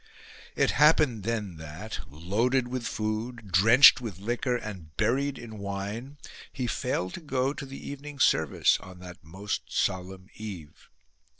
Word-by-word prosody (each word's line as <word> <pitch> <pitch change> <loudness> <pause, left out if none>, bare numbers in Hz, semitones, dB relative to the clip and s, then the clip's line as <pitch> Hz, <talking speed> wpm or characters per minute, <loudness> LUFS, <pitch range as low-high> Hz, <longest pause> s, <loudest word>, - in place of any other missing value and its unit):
It - - +3
happened 150 -6 +4
then 105 -5 -3
that, 80 +8 -7
loaded 110 - 0
with 125 -1 -3
food, 110 0 -4
drenched 115 +9 +8
with 110 -7 -6
liquor 120 +5 -1
and 95 -9 -9
buried 135 +6 +1
in 110 -3 -9
wine, 100 +8 -5 0.3
he 130 - -3
failed 120 -7 -2
to - - -7
go 135 -3 0
to 140 - -7
the 135 - -9
evening 145 +1 -7
service 80 - +3
on 95 -1 -12
that 90 -3 -11
most 95 +6 -4
solemn 95 0 -2
eve. 95 -9 -9
110 Hz, 140 wpm, -28 LUFS, 95-125 Hz, 0.3 s, drenched